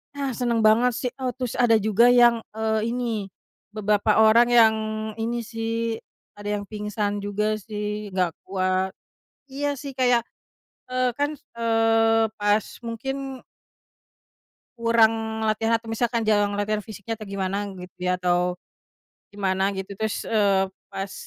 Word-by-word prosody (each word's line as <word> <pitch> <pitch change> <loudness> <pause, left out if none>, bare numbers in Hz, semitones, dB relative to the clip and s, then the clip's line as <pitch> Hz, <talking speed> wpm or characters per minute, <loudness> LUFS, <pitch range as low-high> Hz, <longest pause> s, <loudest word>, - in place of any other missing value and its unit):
Ah, 275 -2 -2
seneng 235 -2 0
banget 230 +3 +5
sih. 250 +1 -2
Oh 255 -1 -1
terus 250 -3 -4
ada 240 -2 +5
juga 220 +2 +4
yang, 240 -1 +6 0.2
eee, 220 0 0
ini, 230 -5 -2 0.5
beberapa 210 +1 +2
orang 230 +2 +6
yang 230 -2 +6 0.4
ini 235 +1 -2
sih, 225 0 -3 0.4
ada 205 - -8
yang - - -9
pingsan 210 -1 -2
juga 210 +1 -1
sih 210 0 -4
gak 180 -3 +2 0.2
kuat. 185 0 0 0.6
Iya 285 +1 -2
sih 275 0 -7
kayak, 245 -3 +2 0.7
eee, 255 0 +2
kan, 290 +2 0 0.2
eee, 225 -1 +3
pas 205 0 +2 0.2
mungkin 265 +3 -5 1.4
kurang 225 -1 +2
latihan 220 +1 +1
atau 225 0 -1
misalkan 235 +1 0
jarang 205 -2 +2
latihan 205 0 -1
fisiknya 220 +1 -6
atau 215 - -8
gimana 195 0 -2
gitu 180 0 -11
ya 180 0 0
atau, 180 0 +1 0.8
gimana 195 -1 0
gitu 195 +1 -5
terus, 220 +1 -3
eee, 200 -3 +3 0.2
pas 195 0 -5
220 Hz, 135 wpm, -24 LUFS, 205-235 Hz, 1.4 s, yang